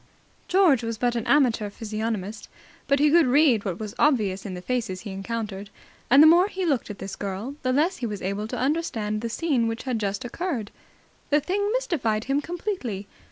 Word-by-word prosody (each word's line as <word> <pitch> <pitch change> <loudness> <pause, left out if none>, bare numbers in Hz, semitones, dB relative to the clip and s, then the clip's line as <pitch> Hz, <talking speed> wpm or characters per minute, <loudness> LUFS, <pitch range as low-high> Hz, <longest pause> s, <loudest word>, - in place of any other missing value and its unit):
George 350 - +4
was 230 -1 -3
but 240 +1 0
an 230 - -2
amateur 240 -7 +3
physiognomist, 215 -1 -4 0.4
but 280 - +3
he 295 +1 +4
could 335 -3 +5
read 255 -5 +4
what 185 -4 -3
was 215 -2 -5
obvious 210 -9 +2
in 185 - -5
the - - -6
faces 225 -7 -2
he 210 - -7
encountered; 200 0 -5 0.4
and 275 +4 +8
the - - +9
more 345 +4 +6
he 380 -3 -3
looked 280 -9 0
at 205 - -6
this 195 0 -6
girl, 200 +6 -4
the 255 - 0
less 315 +8 +2
he 240 - -3
was 205 -2 -5
able 200 +3 -2
to - - -5
understand 245 -8 -1
the 230 - -3
scene 255 -2 0
which 225 0 -3
had 255 -4 -2
just 200 +1 -2
occurred. 245 - -3 0.6
The 295 - +4
thing 405 +6 -1
mystified 240 - 0
him 275 +3 0
completely. 335 - -4
235 Hz, 200 wpm, -25 LUFS, 210-295 Hz, 0.6 s, the